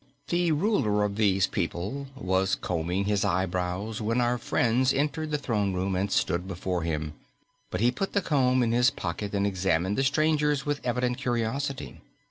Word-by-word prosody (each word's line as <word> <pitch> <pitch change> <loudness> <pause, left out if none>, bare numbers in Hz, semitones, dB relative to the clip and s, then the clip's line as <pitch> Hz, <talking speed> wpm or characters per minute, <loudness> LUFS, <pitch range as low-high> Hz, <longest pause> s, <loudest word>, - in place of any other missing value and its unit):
The 175 -1 +2
ruler 150 - +2
of 100 -1 -1
these 100 -3 +3
people 95 +11 -3
was 95 -5 +1
combing 90 +3 -2
his 105 -1 +1
eyebrows 95 +2 -1
when 115 +3 0
our 120 0 +1
friends 125 +2 +2
entered 150 +2 -1
the 150 - 0
throne 105 -8 -1
room 95 +1 -1
and 95 +2 -1
stood 90 +2 0
before 90 -1 -2
him, 80 -2 -2 0.6
but 90 - -3
he 120 +2 +4
put 195 +10 -3
the 200 - +2
comb 130 -4 +3
in 115 - +1
his 120 +2 +4
pocket 100 -1 -4
and 100 0 +1
examined 95 0 0
the - - +3
strangers 150 0 +2
with 145 -1 -1
evident 125 +1 0
curiosity. 130 +2 -2
110 Hz, 170 wpm, -27 LUFS, 95-135 Hz, 0.6 s, he